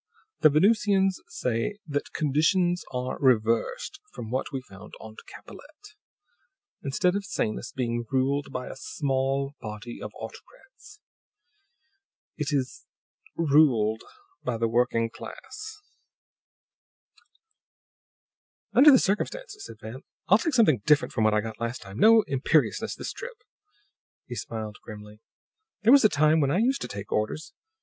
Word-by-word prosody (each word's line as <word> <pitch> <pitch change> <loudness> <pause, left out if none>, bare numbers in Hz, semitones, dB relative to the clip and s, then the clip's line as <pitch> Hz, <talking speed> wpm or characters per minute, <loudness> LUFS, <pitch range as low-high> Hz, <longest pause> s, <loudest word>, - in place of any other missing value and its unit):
The 155 - +6
Venusians 195 +3 +3
say 125 - -2
that 145 -2 -3
conditions 170 +4 +1
are 125 0 -3
reversed 115 - +1
from 115 -2 -8
what 130 +3 -2
we 135 -2 -4
found 100 -3 -13
on 110 -1 -11
Capellette. 415 +1 -14 0.9
Instead 180 +7 +1
of 200 - -2
Sanus 120 - -3
being 120 -2 -2
ruled 135 +2 0
by 125 - -4
a - - -7
small 135 0 -1
body 110 +2 -8
of - - -6
autocrats, 420 -4 -13 1.4
it 150 -2 -3
is 135 -3 -2 0.5
ruled 135 -9 +3 0.4
by 120 -2 -2
the 115 0 +1
working 115 -1 +1
class!" 430 - -9 2.9
"Under 285 +4 +8
the 270 - +8
circumstances," 415 - -2
said - - -11
Van, 115 +5 -8 0.3
"I'll 205 +5 +6
take 310 +2 -1
something 155 - +4
different 150 +3 +3
from 110 - +1
what 110 0 +3
I 105 - +2
got 110 0 -7
last 115 +2 -3
time. 100 +2 -9
No 225 0 +7
imperiousness 140 +3 +1
this - - -6
trip." 485 -1 -9 0.8
He 125 - -8
smiled 110 -1 -6
grimly. 105 -1 -11 0.6
"There 230 +4 +7
was 280 - +7
a 215 - +6
time 155 +1 +3
when 140 -3 +2
I 165 - +1
used 260 +6 +1
to - - -3
take 100 0 -8
orders. 130 - -2
140 Hz, 135 wpm, -26 LUFS, -, 2.9 s, Under